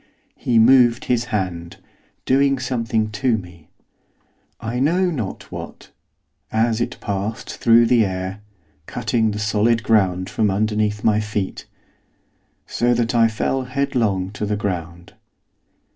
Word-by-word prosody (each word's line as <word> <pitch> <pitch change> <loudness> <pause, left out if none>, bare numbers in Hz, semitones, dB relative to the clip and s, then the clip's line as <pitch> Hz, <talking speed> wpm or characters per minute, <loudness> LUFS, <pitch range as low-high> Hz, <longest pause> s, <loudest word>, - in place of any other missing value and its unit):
He 120 - 0
moved 120 0 +5
his 120 -1 0
hand, 90 -6 -4 0.5
doing 135 +1 +3
something 115 -4 -1
to 120 +1 +1
me, 90 -5 -12 0.9
I 120 +2 -3
know 175 +6 +2
not 115 - -5
what, - - -9 0.6
as 115 +1 +1
it - - -3
passed 100 +3 -4
through 115 0 +5
the 115 -1 +4
air 95 +1 -4 0.5
cutting 115 -1 0
the 105 - -4
solid 110 +2 +1
ground 95 -4 +2
from 110 -2 0
underneath 105 +1 0
my 105 -1 +3
feet, 105 -2 -4 1.0
so 120 0 +1
that 120 0 0
I 115 -1 +5
fell 130 +4 -2
headlong 120 -8 -1
to 105 +1 -4
the 105 0 -1
ground. 85 -4 -5
110 Hz, 130 wpm, -21 LUFS, 100-120 Hz, 1.0 s, moved